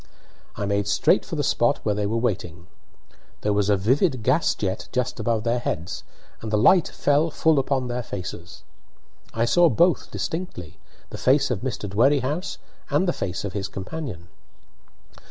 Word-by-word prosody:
I 100 - -3
made 100 0 0
straight 100 - +3
for - - -6
the - - -1
spot - - +2
where 105 - +2
they 105 0 -1
were 110 +3 -1
waiting. 90 -7 -2 0.8
There 105 - +1
was 100 0 +1
a 100 - +4
vivid 130 - +1
gas 135 +8 +2
jet 95 -2 -3
just 125 -1 -2
above 110 0 0
their 120 +1 +1
heads, 90 -6 -4 0.4
and 110 - -5
the 105 - +1
light 170 - +5
fell 145 +3 +1
full 160 -1 +2
upon 130 -2 0
their 125 0 -2
faces. 90 -5 -7 0.7
I 115 +1 0
saw 175 +7 +5
both 170 +8 +2
distinctly 160 - -5 0.3
the - - -7
face 135 +1 +3
of 115 - -1
Mr. 120 -5 -3
Dwerrihouse 135 - +1 0.3
and 190 - +2
the 175 - +2
face 95 +2 -4
of 100 - -4
his 100 -1 -3
companion. 100 - -6
115 Hz, 170 wpm, -24 LUFS, 100-140 Hz, 0.8 s, light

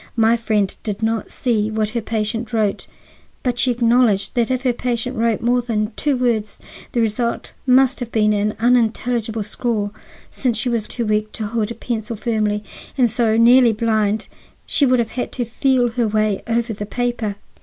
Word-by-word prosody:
My 225 +1 +4
friend 215 -4 0
did 210 0 -4
not 225 0 -1
see 220 -4 0
what 215 -1 -1
her 235 0 -2
patient 225 +2 -2
wrote, 215 -3 0 0.6
but 245 -1 -1
she 255 - +2
acknowledged 235 -4 +2
that 240 -1 +1
if 260 0 -1
her 250 -2 +2
patient 245 +1 -2
wrote 230 -2 +1
more 245 +1 +2
than 220 -2 -1
two 290 -3 0
words 225 -4 -1 0.3
the 240 - +1
result 230 +2 -1
must 260 +1 +4
have 240 -2 -5
been 215 -1 +3
an 210 +1 0
unintelligible 230 -1 +1
scrawl, 210 -1 -2 0.4
since 245 -4 -1
she 245 - -1
was 230 -3 -1
too 235 - -3
weak 215 0 0
to 220 - -4
hold 220 0 -1
a 235 - -5
pencil 230 -1 -4
firmly, 215 -2 -1 0.3
and 245 -4 +3
so 225 -1 +2
nearly 235 0 +6
blind 215 -1 +1
that - - -10 0.4
she 285 - +2
would 255 0 +4
have 235 -2 0
had 250 - -3
to 245 - -2
feel 245 +1 +1
her 235 -1 0
way 215 -1 0
over 230 0 0
the 205 0 -6
paper." 240 -3 -2
230 Hz, 185 wpm, -20 LUFS, 215-245 Hz, 0.6 s, nearly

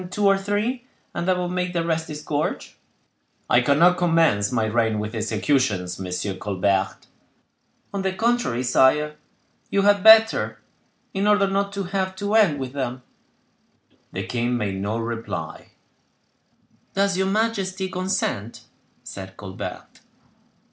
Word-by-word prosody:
"Hang 180 - -8
two 205 +3 -1
or 195 0 +6
three, 210 +6 -2 0.3
and 175 - -3
that 185 -1 +3
would 180 -1 -2
make 180 0 -2
the 170 -1 -1
rest 160 -1 -1
disgorge." 150 0 -3 0.7
"I 120 - +4
cannot 165 +8 +4
commence 165 - +2
my 115 -3 +1
reign 110 0 +1
with 105 +1 -4
executions, 110 -4 0
Monsieur 95 +1 -3
Colbert." 95 0 -1 0.9
"On 200 - -2
the 190 0 0
contrary, 225 - 0
sire, 150 +4 +3 0.5
you 200 - +1
had 205 -1 +4
better, 220 0 +6 0.5
in 195 +1 0
order 205 -1 +4
not 200 +1 -1
to 200 0 -3
have 190 0 -2
to 205 +2 -3
end 200 -10 +4
with 130 -1 -5
them." 130 -2 -4 1.1
The - - -4
king 120 0 -1
made 100 -4 -2
no 105 +3 -2
reply. 115 0 -5 1.2
"Does 195 -1 +2
your 190 +1 +1
majesty 195 -3 -1
consent?" 185 - -2 0.4
said 95 -1 -9
Colbert. 95 -2 -8
165 Hz, 135 wpm, -23 LUFS, -, 1.2 s, or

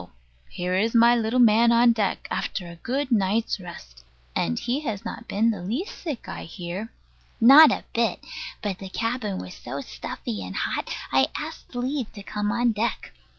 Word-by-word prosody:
Here 180 +1 -3
is 220 +5 +1
my 235 +1 +7
little 230 +1 0
man 235 0 +6
on 235 0 +6
deck, 210 -4 -1
after 180 - -2
a 170 0 -10
good 265 +8 -2
night's 210 0 +1
rest. - - -11 0.3
And 80 0 0
he 250 +4 -1
has 230 -8 -4
not 230 +1 -6
been 225 +3 +2
the 205 -5 -5
least 240 - -3
sick, 295 -8 -5
I - - -6
hear. 180 +6 -6 0.5
Not 275 +6 +9
a - - -2
bit: 230 -5 +1 0.4
but 195 -3 -2
the 195 - -7
cabin 230 -1 -2
was 90 - -7
so - - -6
stuffy 65 - -6
and 90 +1 -7
hot, - - -2 0.2
I 130 0 +4
asked 310 -4 -8
leave 255 0 -2
to 200 - -9
come 210 0 -2
on 240 0 +2
deck. 220 -1 -2
220 Hz, 180 wpm, -25 LUFS, 185-240 Hz, 0.5 s, Not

